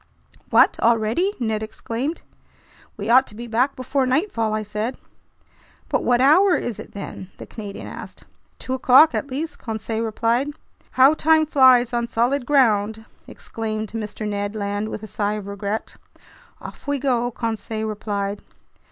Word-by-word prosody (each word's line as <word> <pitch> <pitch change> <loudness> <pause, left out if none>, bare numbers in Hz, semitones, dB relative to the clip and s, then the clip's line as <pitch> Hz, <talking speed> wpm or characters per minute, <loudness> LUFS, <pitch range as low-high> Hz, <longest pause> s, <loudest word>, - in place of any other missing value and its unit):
"What! - - +4
Already!" 235 - +2
Ned 220 -3 -1
exclaimed. 235 +7 -4 0.7
"We 205 - -5
ought 255 +3 +5
to 210 - -12
be 235 +2 -7
back 245 +4 0
before 260 +1 -1
nightfall," 255 - 0
I 215 0 -1
said. 210 +4 -4 0.9
"But - - 0
what 245 -1 +3
hour 350 +8 +5
is 235 - -3
it, - - -10
then?" 195 -2 -8
the - - -9
Canadian 205 -3 -8
asked. - - -10 0.3
"Two 260 - -5
o'clock 260 +4 +6
at - - -2
least," 295 +4 -4
Conseil 220 0 -4
replied. 230 +5 0 0.4
"How 260 +3 +6
time 315 0 +3
flies 260 -5 +5
on 235 0 0
solid 245 +3 0
ground!" 220 -6 +2 0.2
exclaimed 215 -2 -5
Mr. 215 -1 -5
Ned 205 0 -3
Land 205 0 -2
with 220 - -6
a - - -4
sigh 205 0 -2
of 210 -2 -5
regret. 200 +2 -4 0.6
"Off - - -11
we 285 0 0
go!" 245 -3 0
Conseil 220 -2 -4
replied. 205 -1 -3
230 Hz, 150 wpm, -22 LUFS, 215-260 Hz, 0.9 s, o'clock